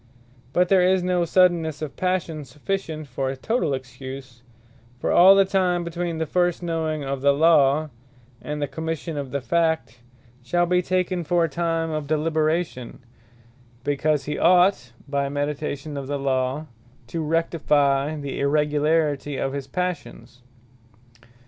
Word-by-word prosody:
But 180 +6 +2
there 190 -2 +5
is 185 0 +3
no 180 -1 +1
suddennesse 165 -3 +2
of 150 - -6
Passion 180 -4 -2
sufficient 155 +3 -4
for 135 0 -3
a 135 - -4
totall 170 - 0
Excuse: 130 -1 -9 0.6
For - - -1
all 190 +3 +8
the 195 0 +5
time 185 -2 +1
between 170 0 -3
the 160 - -1
first 175 +1 0
knowing 160 -3 -2
of 135 -1 -3
the 140 +1 +5
Law, 150 -1 +4 0.5
and 150 0 -5
the 145 - -1
Commission 160 +2 -4
of 140 -2 -4
the 140 +1 -3
Fact, 160 -3 0 0.4
shall 175 +8 +1
be 180 +1 +2
taken 180 0 -1
for 170 +2 +2
a - - +2
time 165 +1 -1
of 155 -2 -3
deliberation; 155 -3 -1 0.9
because 145 +1 0
he 150 0 -3
ought 180 -7 +4 0.2
by 140 0 -1
meditation 145 0 -3
of 140 -1 -5
the 145 0 -2
Law, 135 +2 -1 0.4
to 160 +8 -4
rectifie 150 -3 +1
the 140 -1 -5
irregularity 150 0 +1
of 135 0 -2
his 140 -1 -5
Passions. 130 -7 -5
155 Hz, 145 wpm, -23 LUFS, 140-170 Hz, 0.9 s, all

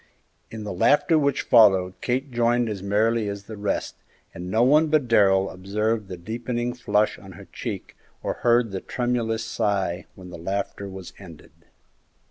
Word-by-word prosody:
In 110 -1 -7
the 105 - -5
laughter 145 - +3
which 140 -2 +1
followed 95 -6 +5
Kate 135 0 -1
joined 120 0 +1
as 100 -3 -5
merrily 105 +2 +1
as 100 0 -6
the 110 +2 -9
rest, 100 -1 -3 0.4
and 90 +1 -7
no 110 +5 +3
one 150 +5 +5
but 150 -4 +2
Darrell 95 -4 +4
observed 105 +3 -2
the 90 -2 -7
deepening 120 +5 -3
flush 105 -3 0
on 95 -1 -12
her 85 - -12
cheek - - -6 0.3
or - - -1
heard 120 -2 +3
the 95 - -4
tremulous 120 -3 -1
sigh 100 -6 -1
when 90 -1 -11
the 85 - -9
laughter 100 +2 -4
was 95 -2 -9
ended. 85 -6 -13
110 Hz, 165 wpm, -24 LUFS, 95-120 Hz, 0.4 s, followed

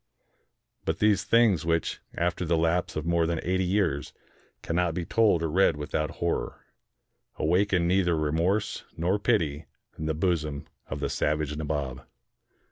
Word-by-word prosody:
But - - -1
these 105 -2 +3
things 115 -9 +4
which, 80 0 0 0.2
after 85 +1 0
the 85 -1 +1
lapse 85 +2 0
of 75 0 -3
more 85 -1 +2
than 85 -1 -1
eighty 95 +1 +1
years, 90 -6 0 0.5
cannot 85 0 0
be 90 - -2
told 100 -4 +3
or 80 - -1
read 95 -3 +3
without 75 +1 -2
horror, 85 0 -2 0.7
awakened 90 +2 +2
neither 90 -2 +2
remorse 85 +7 0
nor 90 +5 +1
pity 80 -9 0 0.3
in 80 - -3
the 80 - 0
bosom 75 -4 -1 0.2
of - - -5
the - - -1
savage 75 0 0
Nabob. 70 -4 -3
85 Hz, 145 wpm, -27 LUFS, 75-95 Hz, 0.7 s, things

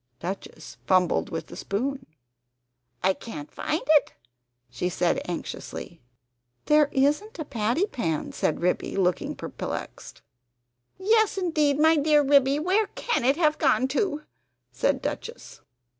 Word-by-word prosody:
Duchess 190 +3 -7
fumbled 185 -2 +2
with 160 -1 -4
the - - -11
spoon 265 +7 -3 1.0
"I 190 +1 +4
can't 150 -9 -9
find 310 +2 -2
it!" 305 -1 +4 0.6
she 175 +9 -2
said 175 0 0
anxiously. 175 -1 -6 0.6
"There 300 -1 +4
isn't 295 +12 +1
a 315 - -4
patty 235 - 0
pan," 165 - -3
said 155 - -1
Ribby, 180 +1 0
looking 180 -4 0
perplexed. - - -7 0.7
"Yes, 435 +2 +2
indeed, 310 -6 +1
my 320 +1 +5
dear 295 0 +4
Ribby; 275 0 +4
where 380 +7 +1
can 475 - -1
it 270 +4 +3
have 305 -3 +2
gone 260 - +3
to?" 300 0 -1 0.5
said - - 0
Duchess. 465 - -6
280 Hz, 130 wpm, -26 LUFS, 190-315 Hz, 1.0 s, my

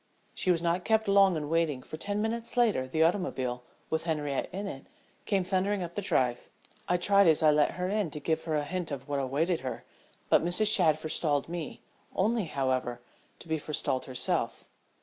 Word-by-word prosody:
She 185 - 0
was 170 -2 +2
not 175 +1 +1
kept 220 +1 +2
long 195 -2 +5
in 150 -1 -4
waiting, 155 -5 0
for - - -8
ten 205 +6 -2
minutes 230 +2 -3
later 215 - +3
the 160 +5 +2
automobile, 135 -9 0 0.3
with 160 +1 -1
Henriette 150 -4 -2
in 195 +3 -4
it, 135 -9 -7 0.4
came 195 -3 +2
thundering 190 +1 0
up 170 0 -6
the 205 - -3
drive. 125 -10 0 0.4
I 180 - +3
tried 200 +2 +4
as 160 -1 +4
I 155 - +7
let 150 0 +3
her 180 0 -2
in 205 -2 0
to 150 - -6
give 160 +3 -1
her 160 -2 -1
a 150 - +1
hint 180 +2 -3
of 140 -2 -6
what 145 -1 -1
awaited 150 +6 0
her, 130 - -6 0.4
but - - +4
Mrs. 205 +5 +2
Shadd 160 -7 +4
forestalled 155 -2 -1
me, 170 -2 -6 0.3
only 220 +1 +1
however 130 -4 -1 0.4
to - - -13
be 160 -1 -1
forestalled 145 -3 -1
herself. 130 -2 -1
165 Hz, 195 wpm, -29 LUFS, 145-195 Hz, 0.4 s, I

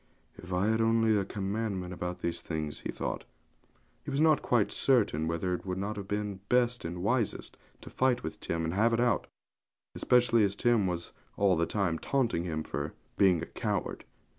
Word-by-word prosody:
'If 90 - -11
I 90 +2 +1
had 110 0 +2
only 115 -1 +3
a 100 - +2
commandment 100 -2 -3
about 90 0 -5
these 85 0 -2
things!' 80 -3 -4
he - - -6
thought. - - -3 0.8
He - - -6
was 140 0 -1
not 155 -1 +5
quite 120 -5 +2
certain 105 - +2
whether 85 +2 -1
it 90 - -3
would 95 -1 -3
not 100 +3 -3
have 100 -2 -6
been 105 -1 -3
best 125 -1 +2
and 85 +2 -5
wisest 115 +1 0 0.3
to - - -10
fight 130 -1 +1
with - - -5
Tim 85 0 -2
and 80 - -2
have 110 +4 +3
it 115 - +2
out; 120 -2 +2 0.7
especially 120 -2 +3
as 100 0 +1
Tim 115 -3 +2
was 85 -1 -3 0.3
all 100 -2 +4
the 85 0 +1
time 90 -6 0
taunting 120 -11 0
him 80 -2 -2
for 75 0 -4 0.2
being 90 -4 +4
a - - -3
coward. - - -3
100 Hz, 190 wpm, -30 LUFS, 90-115 Hz, 0.8 s, not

